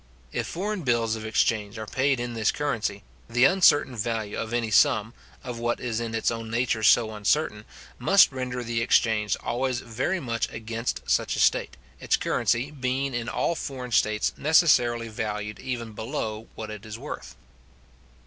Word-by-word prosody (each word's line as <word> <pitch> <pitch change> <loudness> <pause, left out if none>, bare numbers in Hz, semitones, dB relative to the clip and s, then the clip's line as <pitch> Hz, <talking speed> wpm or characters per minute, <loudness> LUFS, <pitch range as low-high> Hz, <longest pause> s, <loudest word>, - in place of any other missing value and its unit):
If - - -2
foreign 200 +3 -3
bills 120 -5 +1
of 110 0 -6
exchange 110 -1 0
are 110 - -5
paid 130 +4 +1
in 120 0 -3
this 110 -2 +1
currency, 115 -8 -2 0.3
the 120 +2 +4
uncertain 145 -6 +4
value 110 -2 -2
of 110 - -4
any 120 -2 -1
sum, 110 +2 +4 0.3
of 125 -2 -6
what 120 0 -1
is 115 -2 -2
in 115 -1 -3
its 115 - +1
own 115 -1 -5
nature 115 -1 0
so 110 0 +4
uncertain, 105 +1 0 0.3
must 195 -4 +6
render 125 -2 -4
the 115 0 -1
exchange 110 -3 +2
always 125 0 -1
very 130 +11 -2
much 115 -6 -2
against 115 +2 -4
such - - +1
a - - -3
state, - - +2 0.2
its - - +1
currency 125 +5 0
being 135 -1 -2
in 120 0 -3
all - - 0
foreign 130 -6 -6
states 110 -1 +2
necessarily 125 -7 +3
valued 105 -1 -4
even 120 -3 -4
below 110 -1 -4
what 110 -1 -6
it 105 -1 -8
is 110 -1 -7
worth. 140 +5 -8
115 Hz, 170 wpm, -26 LUFS, 110-130 Hz, 0.3 s, must